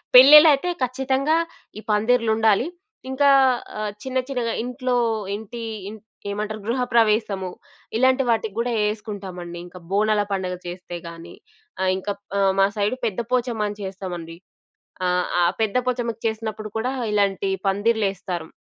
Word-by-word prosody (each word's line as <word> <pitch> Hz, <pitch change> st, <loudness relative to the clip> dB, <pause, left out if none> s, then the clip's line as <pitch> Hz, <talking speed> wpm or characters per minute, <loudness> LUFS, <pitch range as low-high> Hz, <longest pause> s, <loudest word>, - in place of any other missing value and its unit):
పెళ్లి‌ళ్లైతే 295 Hz, +4 st, +9 dB
ఖచ్చితంగా 265 Hz, +4 st, +1 dB, 0.4 s
ఈ -, -, -9 dB
పందిరిలుండాలి. 220 Hz, +1 st, +3 dB, 0.4 s
ఇంకా 280 Hz, +2 st, +3 dB, 0.5 s
ఆహ్, 210 Hz, -1 st, -2 dB
చిన్న 260 Hz, 0 st, -3 dB
చిన్నగా 245 Hz, -4 st, -1 dB
ఇంట్లో 250 Hz, 0 st, -1 dB, 0.4 s
ఏంటీ, 220 Hz, +3 st, -7 dB, 0.3 s
ఇం 215 Hz, -, -8 dB, 0.4 s
ఏమంటారు? 215 Hz, +1 st, -4 dB
గృహప్రవేశము, 220 Hz, -5 st, +1 dB, 0.5 s
ఇలాంటి 260 Hz, +2 st, +3 dB
వాటికి 220 Hz, -3 st, 0 dB
గూడా 240 Hz, +1 st, 0 dB, 0.2 s
ఏసుకుంటామండి. 195 Hz, -5 st, -6 dB
ఇంక 180 Hz, +1 st, -12 dB
బోనాల 210 Hz, +1 st, +2 dB
పండుగ 185 Hz, -2 st, -2 dB
చేస్తే 175 Hz, 0 st, -7 dB
గానీ, 170 Hz, 0 st, -10 dB, 0.5 s
ఆహ్, 190 Hz, -, +2 dB
ఇంక 190 Hz, +2 st, -6 dB
ప్ -, -, -55 dB, 0.2 s
ఆహ్ 195 Hz, -1 st, +3 dB
మా 195 Hz, -, +6 dB
సైడు 210 Hz, +5 st, 0 dB
పెద్ద 210 Hz, -1 st, -2 dB
పోచమ్మ 235 Hz, -4 st, 0 dB
అని 205 Hz, 0 st, -8 dB
చేస్తామండి. 180 Hz, -3 st, -6 dB, 0.7 s
ఆహ్, 180 Hz, 0 st, +1 dB, 0.2 s
ఆ -, -, +5 dB, 0.2 s
పెద్ద 220 Hz, 0 st, 0 dB
పొచమ్మకు 235 Hz, -3 st, -2 dB
చేసినప్పుడు 220 Hz, -1 st, -4 dB
కూడా, 245 Hz, +4 st, -1 dB, 0.2 s
ఇలాంటి 200 Hz, -1 st, +1 dB, 0.2 s
పందిర్లేస్తాం. 195 Hz, -5 st, 0 dB
215 Hz, 130 wpm, -23 LUFS, 195-245 Hz, 0.7 s, పెళ్లి‌ళ్లైతే